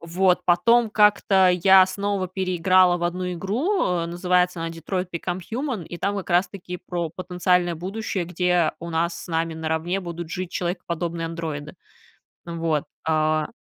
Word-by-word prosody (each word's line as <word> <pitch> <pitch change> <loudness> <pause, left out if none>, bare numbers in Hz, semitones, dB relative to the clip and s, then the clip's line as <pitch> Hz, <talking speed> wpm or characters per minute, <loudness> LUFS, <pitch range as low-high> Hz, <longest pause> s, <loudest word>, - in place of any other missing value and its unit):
Вот. 180 +2 +2
Потом 230 +7 +4
как-то 205 -3 +4
я 185 +1 +6
снова 200 0 -2
переиграла 185 -1 +3
в 175 - -3
одну 180 +1 -2
игру, 255 - 0 0.2
называется 180 +1 +1
она 165 - -3
"Detroit: 175 +3 -4
Become 175 +2 -3
Human", 250 - -2
и 175 - -7
там 200 +3 -1
как 195 -2 -5
раз-таки 180 0 -1
про 170 -3 -2
потенциальное 180 0 0
будущее, 190 +1 -3
где 180 -2 +1
у 170 - -6
нас 170 +1 0
с - - -13
нами 165 0 -1
наравне 160 +4 -2
будут 170 -2 -7
жить 185 0 -4
человекоподобные 170 -2 -3
андроиды. 160 -3 -5 0.7
Вот. 165 -3 -1 0.2
А 155 -1 +1
180 Hz, 145 wpm, -23 LUFS, 170-190 Hz, 0.7 s, я